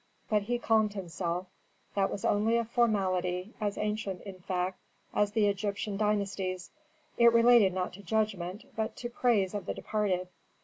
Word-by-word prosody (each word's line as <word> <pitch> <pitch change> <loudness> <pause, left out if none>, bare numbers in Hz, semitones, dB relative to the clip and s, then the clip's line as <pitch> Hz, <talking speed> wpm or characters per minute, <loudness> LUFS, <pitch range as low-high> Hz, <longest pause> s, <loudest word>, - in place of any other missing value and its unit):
But 210 -1 +4
he 240 +4 -1
calmed 220 -3 +2
himself; 175 -1 -3 0.5
that 195 -1 +2
was 195 - -4
only 220 +3 +3
a 235 - 0
formality, 190 -5 0
as 205 -1 -1
ancient, 210 -3 -2
in 195 -2 -9
fact, 180 0 -2 0.3
as 205 0 +1
the 220 -2 +3
Egyptian 205 0 -1
dynasties. 200 -3 -1 0.5
It 235 0 +8
related 230 -3 +6
not 180 0 -2
to 195 - -10
judgment, 200 -2 -1
but 220 0 -2
to 240 -1 -6
praise 220 -6 +2
of 205 - -4
the - - -2
departed. 190 -4 -1
205 Hz, 160 wpm, -30 LUFS, 185-220 Hz, 0.5 s, It